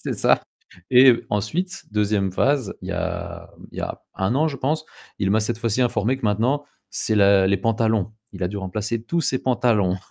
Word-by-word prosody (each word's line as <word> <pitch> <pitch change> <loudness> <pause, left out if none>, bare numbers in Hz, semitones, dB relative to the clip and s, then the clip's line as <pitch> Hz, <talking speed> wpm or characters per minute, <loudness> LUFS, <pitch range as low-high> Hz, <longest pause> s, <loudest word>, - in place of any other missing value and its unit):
c'est - - -2
ça. - - +3 0.5
Et 130 0 +8 0.2
ensuite 170 - -2
2e 105 -2 +1
phase, 135 +3 +1
il - - -7
y - - -2
a - - -4 0.2
il - - -9
y - - -2
a - - -5
1 95 +5 0
an, 155 +4 +2
je 140 - -5
pense, 155 +4 -1 0.3
il 95 -1 0
m'a, 110 +2 +3
cette 110 +2 -1
fois-ci, 115 0 -1
informé 120 0 +1
que 135 - -8
maintenant 120 +8 +1 0.3
c'est 110 +1 -1
la 100 -1 +5
les 100 +1 +3
pantalons. 110 -1 0 0.2
Il 95 -2 -8
a 90 - +1
dû 100 +2 -5
remplacer 105 +4 -3
tous 170 +8 -1
ses 130 - +1
pantalons 110 -7 +2
110 Hz, 200 wpm, -22 LUFS, 100-130 Hz, 0.5 s, Et